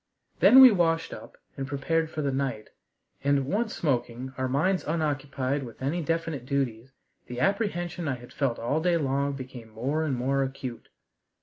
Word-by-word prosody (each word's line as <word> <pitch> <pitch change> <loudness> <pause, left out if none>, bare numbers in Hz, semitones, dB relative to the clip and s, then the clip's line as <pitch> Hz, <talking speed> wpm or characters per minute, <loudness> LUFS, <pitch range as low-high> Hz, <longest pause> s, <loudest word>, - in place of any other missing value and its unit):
Then 265 - +9
we 260 -2 +11
washed 165 -4 +1
up - - -11 0.2
and 135 -1 -4
prepared 160 +4 0
for 155 -1 -4
the 140 - 0
night, 130 -5 -3 0.5
and, 140 -1 +2
once 215 - -1
smoking, 125 -3 -2
our 130 0 -1
minds 180 +8 +1
unoccupied 145 -3 -1
with 120 -4 -9
any 145 +7 -1
definite 165 -4 -2
duties, 130 -3 -2 0.4
the 120 0 -6
apprehension 180 - -1
I 135 - 0
had 120 0 -13
felt 135 -5 0
all 140 +7 -1
day 175 0 +2
long 140 -1 0
became 130 -4 -8
more 130 +8 -1
and 145 -4 0
more 135 +3 0
acute. 130 -2 -5
140 Hz, 170 wpm, -27 LUFS, 130-165 Hz, 0.5 s, we